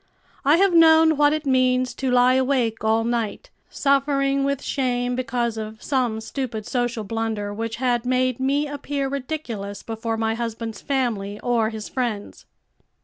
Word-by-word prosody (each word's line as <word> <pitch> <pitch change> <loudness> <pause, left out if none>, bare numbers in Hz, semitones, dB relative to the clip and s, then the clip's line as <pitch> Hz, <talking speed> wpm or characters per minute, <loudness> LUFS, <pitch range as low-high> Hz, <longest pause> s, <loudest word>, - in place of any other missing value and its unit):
I 295 +3 +5
have 390 0 +3
known 320 -1 +6
what 290 0 +4
it 310 0 -2
means 255 -1 +2
to 265 - -2
lie 250 0 +5
awake 255 -4 +1
all 220 +1 +2
night, 235 - -2 0.2
suffering 275 -1 +1
with 280 0 -1
shame 245 -2 -1
because 240 -2 -1
of 215 0 -7
some 250 -5 0
stupid 225 -2 -4
social 245 -2 -1
blunder 220 -1 -3
which 225 +2 -4
had 245 -2 0
made 255 0 +1
me 280 +3 +1
appear 285 -1 -3
ridiculous 255 -8 -5
before 225 0 -3
my 225 0 0
husband's 230 -1 -5
family 220 -7 -2
or 235 -3 +1
his 220 -1 -6
friends." 235 -6 -4
250 Hz, 150 wpm, -23 LUFS, 225-275 Hz, 0.2 s, known